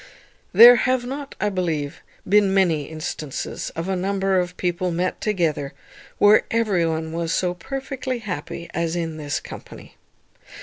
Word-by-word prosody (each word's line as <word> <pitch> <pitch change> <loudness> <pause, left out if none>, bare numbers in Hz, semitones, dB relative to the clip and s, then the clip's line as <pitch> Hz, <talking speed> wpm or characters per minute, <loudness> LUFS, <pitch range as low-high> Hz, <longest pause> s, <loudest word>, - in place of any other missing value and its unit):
There 240 +5 +9
have 255 0 +1
not, 275 +2 -6
I 210 - +1
believe, 165 -5 -2 0.3
been 200 0 +4
many 165 -7 +2
instances 155 -3 -5
of 165 +2 -4
a 190 - 0
number 195 0 +1
of 180 0 -3
people 180 0 -1
met 175 +2 -2
together, 165 -9 -1 0.4
where 205 +1 +6
every 210 -7 +1
one 160 0 -2
was 165 0 -2
so 180 +1 0
perfectly 260 +6 -4
happy 185 -5 -6
as 165 0 -1
in 165 -2 -3
this 145 -2 -3
company. - - -11
180 Hz, 145 wpm, -22 LUFS, 165-210 Hz, 0.4 s, There